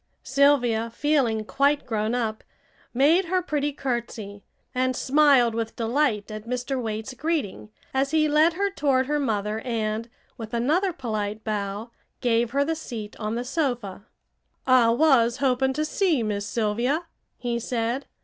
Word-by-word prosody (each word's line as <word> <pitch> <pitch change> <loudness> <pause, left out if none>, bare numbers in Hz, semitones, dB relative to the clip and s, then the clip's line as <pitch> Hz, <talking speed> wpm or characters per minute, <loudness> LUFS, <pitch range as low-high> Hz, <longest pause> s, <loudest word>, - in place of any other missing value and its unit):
Sylvia, 250 -5 +3
feeling 235 -4 +1
quite 280 +4 +1
grown 220 0 -1
up, 220 -3 -2 0.5
made 305 +9 +4
her 370 +2 +1
pretty 295 -3 -1
curtsey, 235 -7 -4 0.3
and 255 0 0
smiled 275 -4 +4
with 225 0 -3
delight 230 -3 0
at 215 +1 -7
Mr. 250 +2 -2
Waite's 220 +2 -4
greeting, 275 - -3 0.2
as 270 +1 +1
he 310 0 +3
led 305 +3 +4
her 400 +3 -1
toward 270 -7 +1
her 295 +2 0
mother 215 -5 -1
and, 225 -1 -2 0.3
with 225 0 -5
another 320 +11 +1
polite 215 -7 -4
bow, 210 +1 -3 0.3
gave 235 -1 +1
her 280 +3 +1
the 325 - 0
seat 230 -9 -7
on 215 0 -2
the 240 +1 -3
sofa. 245 - -2 0.6
"I 255 -3 +5
was 240 -2 +4
hoping 265 -1 +1
to 305 +3 -1
see 320 - +1
Miss 205 -1 -2
Sylvia," 235 +8 0 0.3
he 240 -1 -2
said. 235 +2 -2
245 Hz, 150 wpm, -25 LUFS, 220-285 Hz, 0.6 s, I